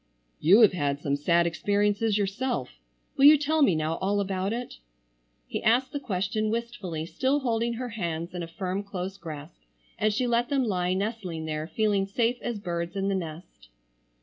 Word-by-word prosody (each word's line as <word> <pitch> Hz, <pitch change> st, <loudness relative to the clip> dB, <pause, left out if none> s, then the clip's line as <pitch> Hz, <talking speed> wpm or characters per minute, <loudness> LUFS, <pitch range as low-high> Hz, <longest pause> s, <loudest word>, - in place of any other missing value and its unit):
"You 195 Hz, +9 st, +6 dB
have 215 Hz, -4 st, +7 dB
had 145 Hz, -5 st, -1 dB
some 140 Hz, -1 st, 0 dB
sad 170 Hz, +4 st, +2 dB
experiences 205 Hz, +4 st, +1 dB
yourself. 205 Hz, -, -1 dB, 0.5 s
Will 275 Hz, -, +5 dB
you 300 Hz, +1 st, +10 dB
tell 305 Hz, +2 st, +1 dB
me 195 Hz, -, +5 dB
now 155 Hz, +1 st, -1 dB
all 200 Hz, +2 st, +1 dB
about 195 Hz, 0 st, -1 dB
it?" 245 Hz, +2 st, -5 dB, 0.7 s
He -, -, -4 dB
asked 245 Hz, +4 st, +3 dB
the 285 Hz, -, -3 dB
question 215 Hz, -2 st, -1 dB
wistfully 210 Hz, -8 st, -3 dB
still 270 Hz, -, 0 dB
holding 235 Hz, -2 st, 0 dB
her 245 Hz, +1 st, -4 dB
hands 170 Hz, -6 st, -4 dB
in 180 Hz, -, -4 dB
a 165 Hz, -, -4 dB
firm 185 Hz, +3 st, -3 dB
close 195 Hz, -1 st, -5 dB
grasp, 150 Hz, -, -9 dB, 0.4 s
and 215 Hz, +1 st, +3 dB
she 225 Hz, +5 st, 0 dB
let 240 Hz, +1 st, +1 dB
them 275 Hz, -2 st, +2 dB
lie 185 Hz, -5 st, 0 dB
nestling 190 Hz, -6 st, -3 dB
there 155 Hz, 0 st, -3 dB
feeling 205 Hz, 0 st, +1 dB
safe 235 Hz, +4 st, 0 dB
as 240 Hz, -3 st, -3 dB
birds 170 Hz, -2 st, -4 dB
in 195 Hz, 0 st, 0 dB
the -, -, +1 dB
nest. 165 Hz, -, -7 dB
200 Hz, 180 wpm, -27 LUFS, 170-230 Hz, 0.7 s, you